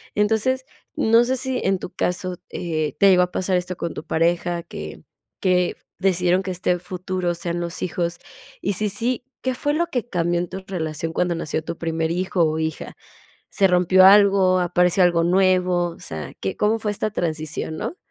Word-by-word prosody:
Entonces, 225 +5 +1 0.3
no 230 +2 +4
sé 260 +1 0
si 260 -1 -1
en 190 -1 +1
tu - - -6
caso, 180 0 -2
eh, 155 -4 -3
¿te 200 - +6
llegó 180 -1 +5
a 180 - -3
pasar 185 -1 0
esto 180 0 -3
con 170 - -4
tu - - -8
pareja, 170 +1 0
que - - -8 0.4
que 180 -2 +2 0.2
decidieron 180 -1 +2
que 185 - -3
este 180 0 0
futuro 180 0 -3
sean 170 0 -3
los 170 0 -4
hijos? 170 -1 -2 0.4
Y 200 - 0
sí, 210 +2 -1
sí, 240 +4 -2 0.2
¿qué 260 -1 -1
fue 290 +3 -1
lo 340 +2 0
que 245 -2 -3
cambió 175 -1 0
en 175 - -2
tu 190 0 -7
relación 160 -3 -3
cuando 175 0 0
nació 160 -1 -3
tu 165 - -6
primer 160 0 -1
hijo 180 0 0
o 155 0 -1
hija? 160 -1 -4 0.6
¿Se 195 -2 +3
rompió 180 +1 +5
algo, 195 -2 +6
apareció 180 +1 +2
algo 170 -1 +3
nuevo? 180 -1 +2
O - - -13
sea, 75 -3 -7
¿qué 95 - -3
cómo 215 +2 +2
fue 210 - -1
esta 215 +1 -2
transición, 155 -3 -3
no? 350 - -4
180 Hz, 190 wpm, -22 LUFS, 170-195 Hz, 0.6 s, te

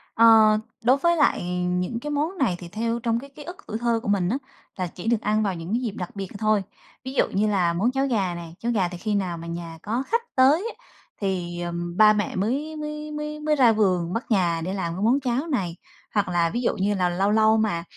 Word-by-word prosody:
Ờ, 220 -2 +7 0.3
đối 255 +3 +5
với 340 +4 +2
lại 290 - +3 0.3
những 180 +6 -1
cái 295 - -5
món 305 +6 -1
này 240 - +1
thì 175 - -8
theo 230 +5 -2
trong 230 -1 0
cái 280 +3 -11
ký 285 +2 -12
ức 350 +4 -8
tuổi 220 - -3
thơ 235 0 +1
của - - -6
mình 190 -3 +2
á, 245 - 0 0.4
là 185 -1 -1
chỉ 175 +4 -9
được 230 -2 +2
ăn 215 +1 +1
vào 195 -3 -1
những 165 +3 -7
cái 240 - +1
dịp 235 -4 -2
đặc 180 +2 -6
biệt 195 -1 -4
thôi. 215 -2 +2 0.4
Ví 260 - -6
dụ - - +2
như 205 +2 +1
là 185 -5 +2
món 200 +9 +1
cháo 270 +1 0
gà 195 -8 0
này, 170 -1 -9
cháo 235 - -1
gà 200 -6 +1
thì 175 - -7
khi 210 +3 -2
nào 185 -4 -1
mà 165 0 -8
nhà 170 -1 -6
có 235 +5 -2
khách 465 +1 +1
tới 305 - +4
á, - - -27 0.4
thì, 180 -3 -2
à, 175 0 -3 0.3
ba 215 0 +7
mẹ 210 -1 -2
mới 270 +11 -1
mới 300 0 -5
mới 300 0 -5
mới 300 0 +1
ra 250 -5 +5
vườn 185 -5 +1
bắt 230 +3 -2
gà 175 -6 +2
để 180 +3 -3
làm 170 -4 -2
cái 185 - -5
món 245 +5 +4
cháo 260 +3 -1
này. 190 - -1 0.4
Hoặc 205 -2 +1
là 170 -1 +2
ví 240 - -2
dụ 245 - 0
như 200 +2 +1
là 180 -2 +1
lâu 190 +3 +1
lâu 220 +1 +4
mà 210 -6 0
215 Hz, 255 wpm, -24 LUFS, 180-260 Hz, 0.4 s, Ờ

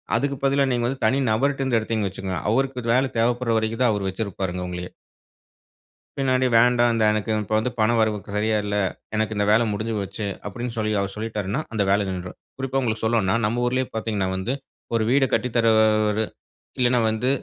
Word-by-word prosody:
அதுக்கு 140 0 0
பதிலா, 140 +1 +3
நீங்க 120 -1 0
வந்து, 135 +1 -4
தனி 130 +5 +3
நபர்டுருந்து 135 +1 +1
எடுத்தீங்கன்னு 110 -3 -1
வச்சுக்கங்க. 95 -3 -4
அவருக்கு 130 +1 0
இது 115 0 +2
வேலை 130 0 +2
தேவைப்படுற 120 0 +1
வரைக்கும் 110 +2 -1
தான், 120 - +4
அவரு 100 -1 -2
வச்சிருப்பாருங்க, 95 -3 -3
உங்களையே. 90 0 -6 1.3
பின்னாடி 130 -1 +2
வேண்டாம். 120 0 +4
த - - +3
எனக்கு 110 +1 -2
இப்ப 110 - -5
வந்து 125 +3 -2
பணம் 115 +1 +3
வரவு 110 -1 +1
க - - -15
சரியா 110 +1 +1
இல்ல. 105 0 -2 0.4
எனக்கு 110 0 -1
இந்த 105 - +2
வேலை 115 +2 +4
முடிஞ்சுபோச்சு, 105 -1 -3 0.2
அப்டீன்னு 120 +3 -5
சொல்லி, 110 -1 0
அவர் 100 0 -3
சொல்லிட்டாருன்னா, 110 +3 -3
அந்த 105 -2 +1
வேலை 100 0 +2
நின்றும். 90 -1 -6 0.2
குறிப்பா, 135 0 -1
உங்களுக்கு 110 -3 -2
சொல்லோணும்னா, 110 -3 +2
நம்ம 120 +3 0
ஊரிலயே 130 +1 0
பார்த்தீங்கன்னா, 105 -4 -1
வந்து 95 +7 -2 0.4
ஒரு 115 - +2
வீட 135 0 +4
கட்டித் 125 -1 0
தரவரு 110 -1 +3 0.5
இல்லன்னா, 125 -1 +3
வந்து 110 +4 0
110 Hz, 180 wpm, -23 LUFS, 105-125 Hz, 1.3 s, தான்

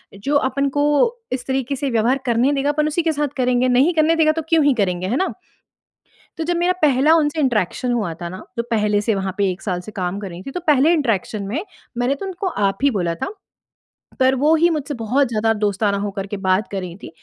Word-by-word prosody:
जो 275 +9 -2
अपन 275 +1 0
को 290 - +3 0.5
इस 255 -1 -4
तरीके 265 0 -1
से 275 +1 -2
व्यवहार 235 +4 +2
करने 240 +3 +2
देगा, 280 0 0
अपन 300 +1 0
उसी 310 +3 0
के 325 - +2
साथ 295 -1 -1
करेंगे। 250 0 +2
नहीं 265 +8 +4
करने 320 0 +3
देगा 315 -1 +4
तो 320 +1 -3
क्यों 325 -2 +4
ही 285 - +5
करेंगे 180 -1 -1
है 235 +7 0
ना? 380 - 0 1.1
तो 325 - -2
जब 345 +1 -1
मेरा 350 +1 +2
पहला 290 +1 +4
उनसे 310 -1 +1
इंटरैक्शन 245 -1 0
हुआ 210 -8 -1
था 170 - -4
ना, 185 +2 -8
तो 235 - 0
पहले 210 -2 +2
से 215 +1 0
वहाँ 190 -1 -3
पे 200 -2 +2
1 180 - -8
साल 180 -3 -2
से 215 - -10
काम 185 0 -2
कर 200 -2 -6
रही 175 0 -9
थी - - -4
तो 360 - -4
पहले 300 +2 +5
इंटरैक्शन 225 - -1
में 270 - -3 0.3
मैंने 245 +3 +1
तो 335 - -7
उनको 380 +1 -4
आप 200 - 0
ही 280 - +4
बोला 175 -6 -1
था, 165 - -4 0.9
पर 260 0 +4
वो 295 +5 +3
ही 335 +2 +4
मुझसे 300 -3 -2
बहुत 255 +5 +1
ज़्यादा 225 -1 +1
दोस्ताना 205 -1 0
हो 205 +1 -2
करके 200 +1 -5
बात 190 +1 +1
कर 195 - -2
रही 175 -2 -7
थीं, - - -7
250 Hz, 235 wpm, -20 LUFS, 200-295 Hz, 1.1 s, ही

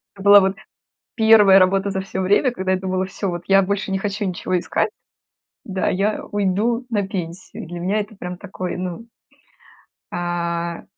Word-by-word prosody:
Это 195 - -12
была 200 0 +8
вот 195 +1 0 0.6
первая 220 -4 +7
работа 195 +1 +2
за 190 -1 -2
всё 190 0 -5
время, 205 +7 +3
когда 190 -4 -2
я 190 - +1
думала: 185 0 -1
"Всё, 195 +1 -4
вот 175 -1 -5
я 195 0 +6
больше 200 +1 -2
не 190 - 0
хочу 205 +1 -3
ничего 185 0 -2 0.9
искать"-да-"я 195 +1 -2
уйду 205 +5 0
на 205 -4 -1
пенсию". 180 -2 -6
И - - -9
для 175 +1 -7
меня 195 +5 0
это 210 +1 -10
прям 180 -1 -6
такой, 185 -2 -5
ну, 185 +5 -5 1.0
а 170 -1 -3
190 Hz, 165 wpm, -21 LUFS, 180-205 Hz, 1.0 s, была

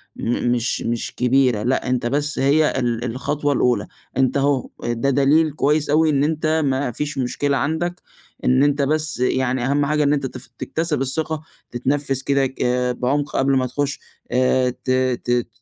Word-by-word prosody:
م 120 +1 -1
مش 120 0 0
مش 115 0 -3
كبيرة، 125 -3 +2
لأ 125 +1 0
أنت 125 -1 0
بس 145 +4 0
هي 145 +1 +3
ال 120 -2 -1
الخطوة 145 +4 -1
الأولى. 125 -2 +1 0.3
أنت 130 +1 +2
أهو، 140 -2 +1
ده 120 +3 0
دليل 145 +4 +3
كويس 150 +1 +1
أوي، 155 +2 +4
إن 140 -1 +2
أنت 155 +1 +1
ما 135 -1 0
فيش 145 +4 -4
مشكلة 140 +2 0
عندك، 165 +5 -2 0.4
إن 130 +2 +4
أنت 145 0 +2
بس 155 0 0
يعني 125 0 0
أهَم 140 +2 +1
حاجة 150 +1 +1
إن 145 0 +3
أنت 140 -2 -1
تف 130 - -6
تكتسِب 160 -4 -2
الثقة، 155 +3 -1 0.3
تتنفس 135 +1 -1
كده 140 -1 +2
ك 130 - -10 0.4
بعُمق 145 +4 -1
قبل 135 0 +2
ما 130 - +1
تخُش. 145 +3 -2 0.3
آآ 130 0 +2
ت 125 +1 -4
ت 130 -1 0
ت 120 -1 +1
135 Hz, 175 wpm, -21 LUFS, 125-145 Hz, 0.4 s, أوي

